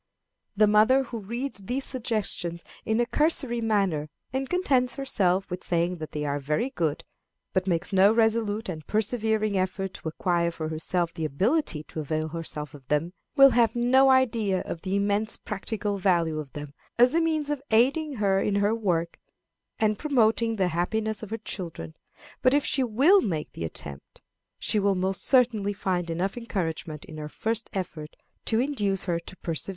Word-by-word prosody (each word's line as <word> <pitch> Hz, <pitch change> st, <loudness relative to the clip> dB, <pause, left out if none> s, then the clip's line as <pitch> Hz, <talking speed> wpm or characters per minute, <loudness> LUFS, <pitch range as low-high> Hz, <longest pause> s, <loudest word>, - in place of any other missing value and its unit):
The 215 Hz, -, +6 dB
mother 215 Hz, +6 st, +5 dB
who 235 Hz, -3 st, -6 dB
reads 235 Hz, +5 st, -5 dB
these 250 Hz, +8 st, -3 dB
suggestions 215 Hz, -9 st, -2 dB, 0.2 s
in 220 Hz, +1 st, +1 dB
a 240 Hz, -, +3 dB
cursory 265 Hz, -3 st, +2 dB
manner, 195 Hz, -9 st, 0 dB, 0.2 s
and 265 Hz, 0 st, -2 dB
contents 265 Hz, -9 st, +1 dB
herself 195 Hz, -9 st, +1 dB
with 180 Hz, -, -4 dB
saying 175 Hz, +1 st, 0 dB
that 155 Hz, -1 st, -7 dB
they 150 Hz, 0 st, -3 dB
are 145 Hz, 0 st, -1 dB
very 150 Hz, -, -1 dB
good, 160 Hz, -, -1 dB, 0.5 s
but 185 Hz, 0 st, 0 dB
makes 175 Hz, +2 st, -1 dB
no 195 Hz, +2 st, +6 dB
resolute 220 Hz, -1 st, +1 dB
and 160 Hz, -4 st, -5 dB
persevering 215 Hz, -2 st, +1 dB
effort 190 Hz, +1 st, -2 dB
to -, -, -8 dB
acquire 170 Hz, +1 st, 0 dB
for 160 Hz, -2 st, -5 dB
herself 165 Hz, +2 st, -1 dB
the 160 Hz, -, -5 dB
ability 170 Hz, -, 0 dB
to 160 Hz, -, -8 dB
avail 155 Hz, +1 st, -2 dB
herself 155 Hz, -3 st, -5 dB
of 135 Hz, -3 st, -14 dB
them, 150 Hz, +5 st, 0 dB, 0.2 s
will 275 Hz, -2 st, +8 dB
have 230 Hz, -1 st, +3 dB
no 260 Hz, +3 st, +4 dB
idea 230 Hz, -7 st, +2 dB
of 165 Hz, -, -6 dB
the 190 Hz, 0 st, -2 dB
immense 205 Hz, +2 st, +1 dB
practical 210 Hz, 0 st, -3 dB
value 170 Hz, -4 st, +2 dB
of 145 Hz, -2 st, -8 dB
them 145 Hz, -2 st, -7 dB, 0.2 s
as 245 Hz, +3 st, +5 dB
a 335 Hz, -, +3 dB
means 310 Hz, -3 st, 0 dB
of 290 Hz, -3 st, -2 dB
aiding 275 Hz, +7 st, +2 dB
her 195 Hz, -3 st, +2 dB
in 205 Hz, -, 0 dB
her 205 Hz, +2 st, +2 dB
work, 175 Hz, -7 st, -1 dB, 0.6 s
and 215 Hz, -1 st, +3 dB
in -, -, -3 dB
promoting 230 Hz, -5 st, +2 dB
the 190 Hz, -4 st, +1 dB
happiness 215 Hz, +6 st, -1 dB
of 220 Hz, -, -7 dB
her 225 Hz, -, -3 dB
children. 165 Hz, -, -6 dB, 0.5 s
But 255 Hz, +2 st, +4 dB
if 290 Hz, -, +2 dB
she 265 Hz, -, +1 dB
will 275 Hz, -, +5 dB
make 160 Hz, -7 st, -3 dB
the 80 Hz, -, -5 dB
attempt, 70 Hz, -3 st, -9 dB, 0.3 s
she 215 Hz, -, 0 dB
will 200 Hz, -1 st, +2 dB
most 190 Hz, +1 st, -1 dB
certainly 230 Hz, -6 st, +3 dB
find 180 Hz, -3 st, -2 dB
enough 180 Hz, +6 st, -2 dB
encouragement 165 Hz, -9 st, -4 dB
in 155 Hz, -, -10 dB
her 150 Hz, 0 st, -6 dB
first 225 Hz, +7 st, -2 dB
effort 165 Hz, -5 st, -5 dB, 0.3 s
to 225 Hz, -, +1 dB
induce 210 Hz, -8 st, 0 dB
her 170 Hz, -3 st, -1 dB
to 185 Hz, +2 st, -11 dB
persevere. 165 Hz, +2 st, -3 dB
200 Hz, 180 wpm, -26 LUFS, 170-235 Hz, 0.6 s, will